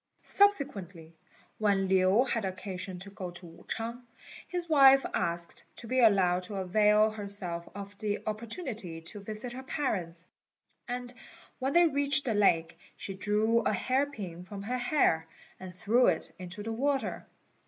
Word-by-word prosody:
Subsequently, 200 Hz, -, +1 dB, 0.4 s
when 200 Hz, -3 st, +2 dB
Lin 190 Hz, +6 st, +4 dB
had 230 Hz, -4 st, -1 dB
occasion 185 Hz, 0 st, -5 dB
to 195 Hz, +2 st, -10 dB
go 185 Hz, -2 st, -6 dB
to 175 Hz, +1 st, -11 dB
Wu 165 Hz, 0 st, -14 dB
ch'ang, 230 Hz, +2 st, -4 dB, 0.5 s
his 355 Hz, -1 st, -1 dB
wife 275 Hz, -3 st, +7 dB
asked 170 Hz, -1 st, -2 dB
to -, -, -5 dB
be 255 Hz, +3 st, 0 dB
allowed 190 Hz, -6 st, +4 dB
to 190 Hz, +3 st, -8 dB
avail 210 Hz, +3 st, +3 dB
herself 200 Hz, -5 st, -2 dB
of 200 Hz, 0 st, -8 dB
the 210 Hz, -2 st, -1 dB
opportunity 215 Hz, -, -4 dB
to 165 Hz, +6 st, 0 dB
visit 215 Hz, +4 st, -4 dB
her 260 Hz, -, -6 dB
parents; 180 Hz, -, -1 dB, 0.6 s
and 245 Hz, 0 st, -5 dB, 0.5 s
when 270 Hz, +1 st, -1 dB
they 345 Hz, 0 st, +6 dB
reached 280 Hz, -2 st, +2 dB
the 235 Hz, -, 0 dB
lake, 165 Hz, -5 st, +2 dB, 0.2 s
she 195 Hz, -, -6 dB
drew 210 Hz, +4 st, +2 dB
a -, -, 0 dB
hair 265 Hz, +2 st, +1 dB
pin 185 Hz, -10 st, -8 dB
from 195 Hz, +1 st, -8 dB
her 250 Hz, +4 st, -2 dB
hair, 245 Hz, -, +2 dB, 0.3 s
and 185 Hz, -1 st, -9 dB
threw 235 Hz, +7 st, +3 dB
it 170 Hz, -3 st, 0 dB
into 185 Hz, +3 st, -6 dB
the 225 Hz, +1 st, -3 dB
water. 275 Hz, +3 st, -1 dB
210 Hz, 155 wpm, -30 LUFS, 185-250 Hz, 0.6 s, wife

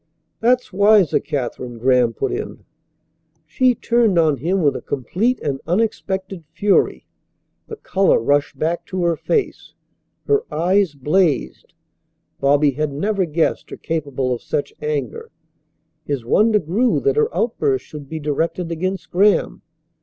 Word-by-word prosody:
"That's 245 Hz, -2 st, +1 dB
wiser, 200 Hz, -3 st, +4 dB
Katherine," 125 Hz, -4 st, -5 dB
Graham 125 Hz, 0 st, +3 dB
put -, -, -3 dB
in. -, -, -6 dB, 0.8 s
She 250 Hz, +11 st, +2 dB
turned 230 Hz, -5 st, +1 dB
on 155 Hz, -4 st, +3 dB
him 175 Hz, +7 st, -1 dB
with 145 Hz, -, +2 dB
a -, -, -5 dB
complete 185 Hz, -, -1 dB
and 135 Hz, -2 st, -3 dB
unexpected 190 Hz, -2 st, -2 dB
fury. 205 Hz, -1 st, +1 dB, 0.6 s
The 445 Hz, -, -7 dB
colour 195 Hz, -, +2 dB
rushed 145 Hz, +5 st, 0 dB
back 165 Hz, +2 st, -1 dB
to 185 Hz, -1 st, -3 dB
her 170 Hz, -1 st, +2 dB
face. 420 Hz, -, -2 dB, 0.5 s
Her 425 Hz, 0 st, +2 dB
eyes 180 Hz, -1 st, +1 dB
blazed. 150 Hz, +1 st, 0 dB, 0.6 s
Bobby 145 Hz, +1 st, +3 dB
had 150 Hz, +2 st, -2 dB
never 195 Hz, +7 st, -1 dB
guessed 160 Hz, 0 st, -1 dB
her -, -, -8 dB
capable 140 Hz, -5 st, -2 dB
of 120 Hz, -, -5 dB
such 145 Hz, -, -3 dB
anger. 150 Hz, -, -3 dB, 0.7 s
His 140 Hz, -5 st, -4 dB
wonder 215 Hz, -, +3 dB
grew 210 Hz, +8 st, +1 dB
that 420 Hz, +1 st, +1 dB
her 450 Hz, 0 st, +2 dB
outburst 400 Hz, -2 st, -1 dB
should 145 Hz, -3 st, -10 dB
be 160 Hz, -, -5 dB
directed 165 Hz, +4 st, -2 dB
against 185 Hz, +1 st, -3 dB
Graham. 200 Hz, +3 st, +2 dB
170 Hz, 140 wpm, -20 LUFS, 145-205 Hz, 0.8 s, wiser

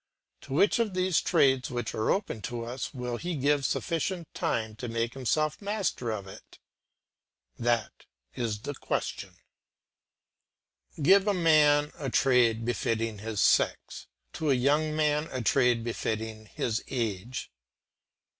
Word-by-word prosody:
To 135 Hz, -, -8 dB
which 200 Hz, +10 st, +3 dB
of 215 Hz, -5 st, 0 dB
these 185 Hz, -2 st, +2 dB
trades 130 Hz, -2 st, +3 dB
which 120 Hz, -2 st, -3 dB
are 110 Hz, -, -1 dB
open 195 Hz, -, -1 dB
to 120 Hz, -1 st, -4 dB
us 125 Hz, +2 st, -5 dB
will 125 Hz, -2 st, -4 dB
he 175 Hz, +3 st, -3 dB
give 145 Hz, 0 st, +1 dB
sufficient 170 Hz, +3 st, -2 dB
time 110 Hz, -1 st, -2 dB
to 125 Hz, -, -5 dB
make 115 Hz, 0 st, -2 dB
himself 155 Hz, -, 0 dB
master 200 Hz, -, -2 dB
of 105 Hz, -3 st, -3 dB
it? 95 Hz, -, -13 dB, 1.0 s
That 120 Hz, -2 st, -1 dB, 0.3 s
is 110 Hz, -4 st, -3 dB
the -, -, -7 dB
whole -, -, -18 dB
question. -, -, -3 dB, 1.6 s
Give 190 Hz, +7 st, +5 dB
a 205 Hz, -, +2 dB
man 150 Hz, -3 st, +4 dB
a 140 Hz, -3 st, -3 dB
trade 120 Hz, -3 st, +3 dB
befitting 115 Hz, -2 st, -1 dB
his 110 Hz, 0 st, -3 dB
sex, -, -, +1 dB, 0.3 s
to 155 Hz, -, -2 dB
a 135 Hz, -, +5 dB
young 150 Hz, +4 st, +2 dB
man 150 Hz, 0 st, +1 dB
a 130 Hz, -2 st, -3 dB
trade 125 Hz, -1 st, +3 dB
befitting 110 Hz, -1 st, -4 dB
his 110 Hz, +1 st, -2 dB
age. 115 Hz, -1 st, -3 dB
130 Hz, 140 wpm, -28 LUFS, 115-155 Hz, 1.6 s, Give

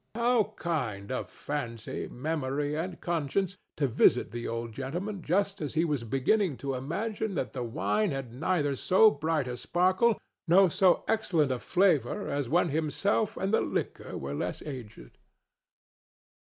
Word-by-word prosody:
How 235 Hz, -2 st, +2 dB
kind 120 Hz, -, -2 dB
of 130 Hz, -, -3 dB
Fancy, 120 Hz, -6 st, -5 dB
Memory 145 Hz, +1 st, -2 dB
and 170 Hz, +3 st, -4 dB
Conscience 170 Hz, +3 st, -1 dB, 0.2 s
to 145 Hz, -, +2 dB
visit 125 Hz, 0 st, +3 dB
the 120 Hz, 0 st, -4 dB
old 115 Hz, 0 st, -3 dB
gentleman 175 Hz, -, -4 dB
just 195 Hz, +4 st, 0 dB
as 150 Hz, -1 st, -4 dB
he 165 Hz, +2 st, +3 dB
was 145 Hz, -7 st, -1 dB
beginning 135 Hz, -, +1 dB
to 140 Hz, -1 st, -3 dB
imagine 200 Hz, -, -3 dB
that -, -, -2 dB
the 130 Hz, -, -4 dB
wine 190 Hz, -, 0 dB
had 135 Hz, -5 st, -4 dB
neither 145 Hz, 0 st, 0 dB
so 195 Hz, -, +5 dB
bright 155 Hz, -1 st, -1 dB
a 125 Hz, -, -3 dB
sparkle 185 Hz, -, +2 dB, 0.3 s
nor 185 Hz, +1 st, +6 dB
so 185 Hz, +1 st, +4 dB
excellent 175 Hz, -10 st, +2 dB
a 125 Hz, -, -1 dB
flavor 180 Hz, -, +2 dB
as 140 Hz, -3 st, -2 dB
when 175 Hz, +2 st, +3 dB
himself 160 Hz, +8 st, 0 dB
and 195 Hz, +2 st, -1 dB
the -, -, +4 dB
liquor -, -, -3 dB
were 70 Hz, +1 st, -5 dB
less 90 Hz, +5 st, -3 dB
aged! 120 Hz, -, -9 dB
155 Hz, 155 wpm, -29 LUFS, 130-190 Hz, 0.3 s, nor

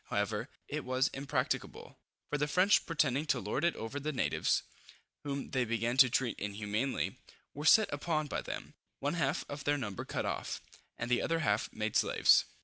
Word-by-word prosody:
However, -, -, -1 dB, 0.2 s
it -, -, -3 dB
was 130 Hz, +1 st, +1 dB
impracticable, 135 Hz, +1 st, -3 dB, 0.3 s
for 145 Hz, -, 0 dB
the 150 Hz, -, +1 dB
French 185 Hz, +6 st, +4 dB
pretending 150 Hz, -3 st, +1 dB
to -, -, +2 dB
lord 105 Hz, -, -2 dB
it 170 Hz, -, +2 dB
over 115 Hz, +6 st, -5 dB
the 150 Hz, +2 st, -2 dB
natives, 135 Hz, -, +1 dB, 0.6 s
whom 140 Hz, -1 st, -4 dB
they 130 Hz, -1 st, +2 dB
began 115 Hz, +1 st, -1 dB
to 130 Hz, -1 st, +8 dB
treat 120 Hz, 0 st, 0 dB
inhumanly, 105 Hz, +5 st, -2 dB, 0.3 s
were 150 Hz, +2 st, -6 dB
set 215 Hz, -1 st, +6 dB
upon 155 Hz, +1 st, -1 dB
by 145 Hz, -, -3 dB
them, -, -, -6 dB, 0.2 s
one 145 Hz, +3 st, -1 dB
half 170 Hz, -, 0 dB
of 145 Hz, 0 st, -6 dB
their 145 Hz, +1 st, +2 dB
number 105 Hz, -8 st, -4 dB
cut -, -, -3 dB
off, -, -, -3 dB, 0.4 s
and 120 Hz, +1 st, -4 dB
the 125 Hz, -, +3 dB
other 165 Hz, 0 st, 0 dB
half 105 Hz, -7 st, +1 dB
made 110 Hz, 0 st, -3 dB
slaves. -, -, +5 dB
140 Hz, 180 wpm, -33 LUFS, 115-150 Hz, 0.6 s, to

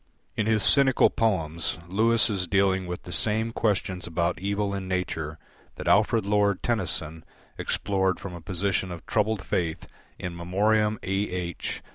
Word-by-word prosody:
In 110 Hz, -, 0 dB
his 110 Hz, -2 st, +3 dB
cynical 135 Hz, -2 st, +5 dB
poems, 85 Hz, -7 st, -1 dB
Lewis 110 Hz, +5 st, +3 dB
is 95 Hz, -5 st, -2 dB
dealing 95 Hz, 0 st, +2 dB
with 90 Hz, 0 st, -5 dB
the 90 Hz, -, -9 dB
same 110 Hz, +4 st, +2 dB
questions 95 Hz, -5 st, -1 dB
about 85 Hz, +1 st, -1 dB
evil 100 Hz, +1 st, -1 dB
in 95 Hz, -1 st, -4 dB
nature 80 Hz, -4 st, -3 dB, 0.4 s
that -, -, -7 dB
Alfred 110 Hz, +1 st, +3 dB
Lord 100 Hz, -1 st, +2 dB
Tennyson 80 Hz, -8 st, -2 dB, 0.4 s
explored 95 Hz, -2 st, 0 dB
from 100 Hz, -, -7 dB
a 85 Hz, -, -8 dB
position 95 Hz, +1 st, -1 dB
of 85 Hz, -2 st, -8 dB
troubled 105 Hz, -2 st, 0 dB
faith 80 Hz, -3 st, -1 dB, 0.3 s
in 90 Hz, -, -5 dB
"In -, -, -10 dB
Memoriam 105 Hz, +5 st, +1 dB
A. 95 Hz, -, -2 dB, 0.2 s
H." 90 Hz, -2 st, -4 dB
95 Hz, 155 wpm, -26 LUFS, 90-105 Hz, 0.4 s, cynical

